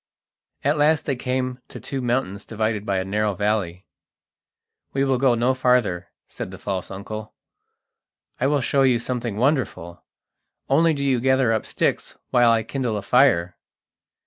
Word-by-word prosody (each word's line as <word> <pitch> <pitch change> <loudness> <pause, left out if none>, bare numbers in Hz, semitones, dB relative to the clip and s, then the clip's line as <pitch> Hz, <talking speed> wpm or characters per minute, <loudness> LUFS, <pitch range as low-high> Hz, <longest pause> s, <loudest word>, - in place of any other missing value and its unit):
At 145 +2 +2
last 150 +1 +3
they 140 - 0
came 125 0 -2
to - - -10
two 135 -1 -4
mountains 120 -6 -1
divided 110 -1 -2
by 100 - +1
a 95 - -1
narrow 105 +1 0
valley. 100 -3 -1 1.1
"We 135 - +1
will 135 -2 +1
go 130 -2 +3
no 120 +3 +2
farther," 125 -9 +1 0.2
said - - -7
the 95 - -9
false 95 -1 -4
uncle. 105 +2 -7 1.0
"I 130 - +2
will 145 -1 +1
show 135 +3 +1
you 130 -3 +4
something 120 -3 -3
wonderful; 110 - -1 0.6
only 160 +3 +3
do 140 0 -2
you 130 -3 +2
gather 130 -2 +3
up 110 - -2
sticks - - -1
while 120 -1 +5
I 115 -1 +2
kindle 125 -5 -2
a 100 - -5
fire." 100 - +3
120 Hz, 160 wpm, -23 LUFS, 100-130 Hz, 1.1 s, while